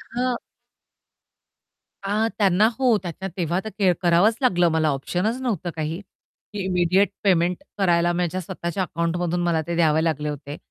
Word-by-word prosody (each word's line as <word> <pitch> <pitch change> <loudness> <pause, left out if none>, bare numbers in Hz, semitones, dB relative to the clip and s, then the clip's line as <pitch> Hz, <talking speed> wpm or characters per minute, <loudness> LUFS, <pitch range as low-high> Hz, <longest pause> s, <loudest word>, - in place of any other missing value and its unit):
हां. 250 0 0 1.7
अ, 210 +3 +1
त्यांना 200 0 +4
हो, 250 -4 +4
त्याच्या 180 +2 -5
तेव्हा 175 0 0
तर 220 - -5
क 190 -3 +4
करावंच 180 +5 +4
लागलं 175 -9 +3
मला 160 -1 +2
ऑप्शनच 180 - -1
नव्हतं 200 -9 -2
काही, 160 +2 -3 0.5
की 205 -2 -3
इमिडिएट 180 +2 +2
पेमेंट 180 -2 +2
करायला 175 -3 +2
माझ्या 180 +1 -1
स्वतःच्या 175 +1 -3
अकाउंटमधून 175 0 -1
मला 170 -2 +1
ते 170 - -2
द्यावे 160 -2 +3
लागले 150 -2 -1
होते. 145 0 -6
175 Hz, 145 wpm, -23 LUFS, 165-195 Hz, 1.7 s, त्यांना